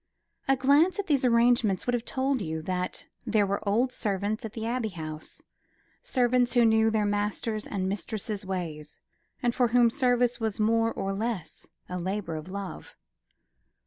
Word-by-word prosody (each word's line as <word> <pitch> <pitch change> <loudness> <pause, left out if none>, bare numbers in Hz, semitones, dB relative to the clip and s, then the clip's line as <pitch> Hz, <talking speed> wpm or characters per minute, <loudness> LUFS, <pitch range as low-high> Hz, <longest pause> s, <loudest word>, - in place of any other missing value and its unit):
A 270 - +4
glance 285 +8 +4
at 405 - -2
these 285 -6 +1
arrangements 235 -4 +3
would 245 - 0
have 240 -1 -1
told 265 -1 0
you 160 -3 -4
that 180 +1 -3 0.2
there 215 -3 +2
were 200 +1 -1
old 240 +5 +2
servants 205 -1 -2
at 220 -2 -6
the 225 -2 -4
Abbey 235 -1 -1
House, 155 -4 -8 0.6
servants 250 - +2
who 240 -2 +5
knew 220 0 +4
their 220 -1 +1
master's 210 +1 -1
and 190 -2 -2
mistress's 210 +1 -4
ways, 165 -6 -5 0.4
and 240 -1 +2
for 245 0 +3
whom 235 0 +4
service 245 -2 +2
was 220 -2 -2
more 225 +1 +2
or 195 -2 -3
less 210 -4 -4 0.2
a 180 0 -4
labour 185 -2 -3
of 155 +3 -7
love. 195 0 -7
220 Hz, 165 wpm, -28 LUFS, 195-245 Hz, 0.6 s, who